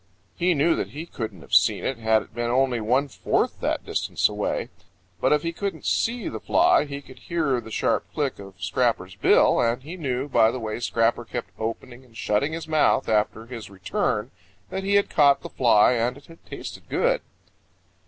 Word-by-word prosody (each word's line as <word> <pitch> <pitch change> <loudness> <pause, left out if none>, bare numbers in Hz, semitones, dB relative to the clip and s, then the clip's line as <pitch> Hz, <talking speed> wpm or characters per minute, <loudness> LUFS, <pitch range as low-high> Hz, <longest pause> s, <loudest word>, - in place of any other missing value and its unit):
He 175 0 +2
knew 160 +4 +3
that - - -2
he 155 +3 -7
couldn't 110 - -6
have 70 - -14
seen - - +4
it 130 -3 -2
had 110 -1 +2
it - - -22
been 120 +1 -2
only 125 -1 +2
one 130 +6 +2
fourth 135 - -1
that - - -2
distance - - 0
away. - - -2 0.5
But - - +2
if 150 0 +3
he 170 0 -2
couldn't 200 +3 -4
see 235 0 0
the - - -5
fly 350 - +3
he 140 -1 -7
could 130 - -14
hear 155 -8 -1
the 110 - -11
sharp - - -1
click 145 -7 -2
of 100 -1 -11
Scrapper's 95 -3 0
bill, - - +4
and 120 +2 0
he 165 +6 -8
knew 135 -4 -2
by 115 -5 +4
the 130 - -4
way 110 -1 -4
Scrapper 115 0 +1
kept 120 0 -6
opening 120 +3 -5
and 115 -3 -17
shutting 120 +10 0
his 165 0 -5
mouth 155 -3 +2
after 110 +1 0
his 115 -3 -8
return 95 -2 -2 0.4
that 190 - -3
he 200 +1 +1
had 200 - +4
caught 140 -2 +4
that - - -9
fly 115 -4 +5
and 120 +1 0
it 140 - -16
had 165 0 -16
tasted - - -8
good. - - +1
130 Hz, 200 wpm, -24 LUFS, 115-155 Hz, 0.5 s, fly